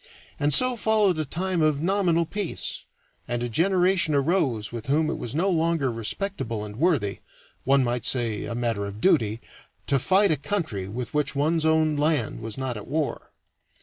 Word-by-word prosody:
And 145 0 +1
so 255 - +6
followed 210 -6 +2
a 155 - -1
time 180 +4 -2
of 155 -2 +2
nominal 175 -1 +1
peace, 200 +1 -4 0.4
and 120 0 -2
a 120 - -2
generation 180 - +2
arose 140 - 0
with 115 -1 -7
whom 155 +3 +1
it - - -4
was 120 +3 -4
no 175 +5 +1
longer 165 -5 +1
respectable 115 - -3
and 105 0 -9
worthy 130 - +1 0.5
one 135 0 +4
might 120 -1 -1
say 115 -5 0
a 115 - -4
matter 115 -4 -1
of 100 +1 -8
duty 115 - +2 0.4
to 140 - +1
fight 195 - +3
a 155 - +2
country 140 - -3
with 120 +5 -6
which 150 -2 0
one's 160 +3 +1
own 160 -1 +2
land 145 -6 0
was 110 -1 -6
not 130 -3 -3
at 105 - -9
war. 150 +2 -3
150 Hz, 180 wpm, -25 LUFS, 120-170 Hz, 0.5 s, so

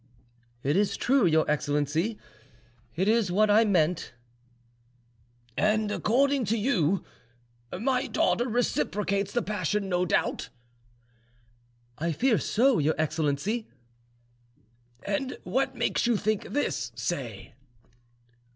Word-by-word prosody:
"It 145 +3 +1
is 200 0 +1
true, 270 -4 +3
your 160 -1 +3
excellency; 150 +7 0 0.8
it 185 +4 0
is 220 -4 +2
what 210 +3 +3
I 215 +2 +6
meant." 175 -6 +1 1.4
"And, 210 0 +1
according 270 +4 +2
to 220 +4 0
you, 200 - +1 0.8
my 260 +3 0
daughter 220 +1 +1
reciprocates 205 -4 0
the 240 - 0
passion, 205 0 -2
no 180 0 +1
doubt?" - - 0 1.5
"I 165 +1 -1
fear 235 - +2
so, 250 +2 +2
your 155 +2 +1
excellency." 155 +8 -1 1.4
"And 230 +7 -2
what 265 0 -1
makes - - 0
you 235 -3 +2
think 215 0 -1
this, 120 - -2
say?" 120 - -4
205 Hz, 105 wpm, -27 LUFS, 165-230 Hz, 1.5 s, I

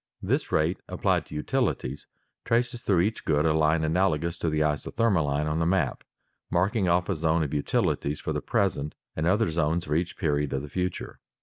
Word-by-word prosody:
This - - 0
rate 80 +4 +1
applied - - 0
to - - -9
utilities 70 -2 -1 0.4
traces 120 +1 0
through 95 -7 +2
each 105 +5 -1
good 75 -1 +2
a 80 - +3
line 80 +1 +2
analagous 85 0 +1
to 85 - 0
the 75 0 0
isothermal 80 +4 +1
line 70 +1 0
on 75 +1 -1
the 80 - +1
map, 85 -8 0 0.5
marking 95 +3 +1
off 90 +1 +2
a 95 - 0
zone 80 +1 +1
of 75 - -4
utilities 75 0 0
for 80 - -3
the 75 - -2
present 95 - -1 0.2
and 80 +1 0
other 100 0 +2
zones 80 +1 0
for 75 - -2
each 85 +3 -1
period 75 -2 0
of 70 0 -2
the 75 - -8
future. 90 +3 -3
80 Hz, 195 wpm, -27 LUFS, 75-90 Hz, 0.5 s, a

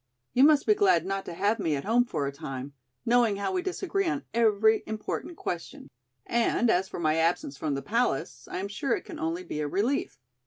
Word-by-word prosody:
"You 255 - +5
must 300 -2 +5
be 215 - +5
glad 185 -5 +3
not 195 0 -2
to 170 - -6
have 205 +5 +1
me 165 -6 0
at 140 - -4
home 240 +3 +3
for 150 - -2
a 140 - -2
time, 140 -2 -7 0.3
knowing 235 -3 +3
how 200 - -2
we 370 -1 0
disagree 380 +1 -1
on 285 -4 -1
every 220 -1 +4
important 220 +10 -4
question. 170 -5 -5 0.4
And, 235 0 +2
as 190 0 +1
for - - -6
my 155 -1 +1
absence 165 -3 0
from 145 0 -2
the 135 - -4
palace, 205 - -1
I - - -4
am 190 +2 -3
sure 235 +5 -1
it - - -7
can - - -8
only 165 +3 -2
be 160 -3 -5
a 150 - -1
relief. 205 - -1
200 Hz, 220 wpm, -28 LUFS, 160-235 Hz, 0.4 s, You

